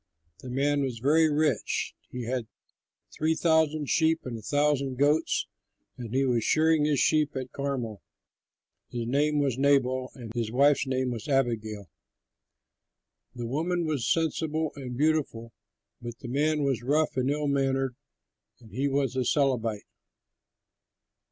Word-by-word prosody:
The 130 Hz, -, -9 dB
man 140 Hz, +3 st, +1 dB
was 130 Hz, -4 st, -2 dB
very 155 Hz, +6 st, +3 dB
rich; 150 Hz, +1 st, 0 dB, 0.2 s
he 125 Hz, -1 st, -5 dB
had 120 Hz, -1 st, -3 dB, 0.7 s
three 160 Hz, +1 st, +1 dB
thousand 160 Hz, -3 st, +2 dB
sheep 160 Hz, +1 st, +2 dB
and 125 Hz, -2 st, -4 dB
a 115 Hz, -, -7 dB
thousand 145 Hz, +1 st, +1 dB
goats, 145 Hz, +3 st, +2 dB, 0.5 s
and 120 Hz, -3 st, -8 dB
he 135 Hz, +2 st, +2 dB
was 120 Hz, -3 st, +1 dB
shearing 155 Hz, +1 st, +3 dB
his 150 Hz, -3 st, +2 dB
sheep 155 Hz, -2 st, +2 dB
at 130 Hz, -1 st, -5 dB
Carmel. 130 Hz, -7 st, -4 dB, 0.9 s
His 120 Hz, -1 st, -4 dB
name 145 Hz, +5 st, +1 dB
was 135 Hz, -4 st, 0 dB
Nabal, 130 Hz, -2 st, +2 dB
and 115 Hz, -4 st, -9 dB
his 115 Hz, -2 st, -2 dB
wife's 140 Hz, +3 st, +3 dB
name 130 Hz, -1 st, 0 dB
was 115 Hz, -3 st, -6 dB
Abigail. 110 Hz, -7 st, -1 dB, 1.5 s
The 120 Hz, -1 st, -5 dB
woman 165 Hz, +7 st, -1 dB
was 145 Hz, -6 st, -1 dB
sensible 160 Hz, -1 st, 0 dB
and 125 Hz, -3 st, -6 dB
beautiful, 140 Hz, -7 st, 0 dB, 0.5 s
but 120 Hz, 0 st, -7 dB
the 125 Hz, -, -9 dB
man 150 Hz, +3 st, +1 dB
was 135 Hz, -5 st, 0 dB
rough 150 Hz, +5 st, +1 dB
and 130 Hz, +1 st, 0 dB
ill 150 Hz, +1 st, -1 dB
mannered; 135 Hz, -2 st, 0 dB, 0.6 s
and 115 Hz, -4 st, -17 dB
he 135 Hz, +7 st, -1 dB
was 135 Hz, -2 st, 0 dB
a 130 Hz, -, +1 dB
Calebite. 120 Hz, -6 st, 0 dB
135 Hz, 145 wpm, -27 LUFS, 125-150 Hz, 1.5 s, very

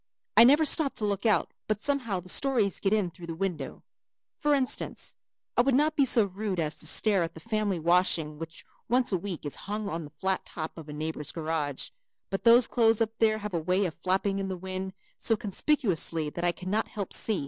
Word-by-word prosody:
I 230 Hz, -, +9 dB
never 295 Hz, +5 st, +5 dB
stop 295 Hz, -1 st, +5 dB
to 215 Hz, -, -1 dB
look 205 Hz, +2 st, -1 dB
out 215 Hz, -, +2 dB, 0.2 s
but 215 Hz, -1 st, 0 dB
somehow 250 Hz, -8 st, -1 dB
the 180 Hz, -, -12 dB
stories 230 Hz, -1 st, +2 dB
get 195 Hz, -, 0 dB
in 205 Hz, -5 st, +1 dB
through 170 Hz, +1 st, -11 dB
the 165 Hz, -, -5 dB
window. 170 Hz, -6 st, -4 dB, 0.6 s
For 295 Hz, -1 st, +3 dB
instance, 265 Hz, -2 st, -2 dB, 0.4 s
I -, -, +5 dB
would 260 Hz, +1 st, +2 dB
not 300 Hz, +3 st, +2 dB
be 280 Hz, -3 st, +4 dB
so 235 Hz, -3 st, +4 dB
rude 200 Hz, -1 st, -3 dB
as 155 Hz, -2 st, 0 dB
to 155 Hz, -, -5 dB
stare 200 Hz, +2 st, +4 dB
at 165 Hz, -1 st, -3 dB
the -, -, -9 dB
family 215 Hz, 0 st, -1 dB
washing 165 Hz, -2 st, +1 dB
which 165 Hz, 0 st, -8 dB, 0.2 s
once 250 Hz, 0 st, +2 dB
a 190 Hz, -, +2 dB
week 180 Hz, -4 st, -6 dB
is 145 Hz, -, -3 dB
hung 210 Hz, 0 st, -3 dB
on 165 Hz, -2 st, -4 dB
the 145 Hz, -, -13 dB
flat 190 Hz, 0 st, -1 dB
top 155 Hz, -1 st, -7 dB
of 160 Hz, -2 st, -10 dB
a -, -, -5 dB
neighbor's 155 Hz, -1 st, -4 dB
garage, 155 Hz, -4 st, -3 dB, 0.4 s
but 195 Hz, -, -3 dB
those 235 Hz, +1 st, +7 dB
clothes 225 Hz, -2 st, +3 dB
up 225 Hz, -1 st, +1 dB
there 220 Hz, -1 st, +3 dB
have 210 Hz, -2 st, -6 dB
a 170 Hz, -, 0 dB
way 185 Hz, +5 st, +1 dB
of 170 Hz, -, -3 dB
flapping 195 Hz, +3 st, -1 dB
in 195 Hz, -, -3 dB
the 190 Hz, -1 st, -4 dB
wind 190 Hz, +1 st, -5 dB, 0.3 s
so 225 Hz, -, +3 dB
conspicuously 195 Hz, -, 0 dB
that 170 Hz, -, -6 dB
I 175 Hz, -, +3 dB
cannot 190 Hz, +5 st, -2 dB
help 200 Hz, -3 st, -6 dB
see. 215 Hz, -4 st, +1 dB
195 Hz, 220 wpm, -28 LUFS, 170-225 Hz, 0.6 s, I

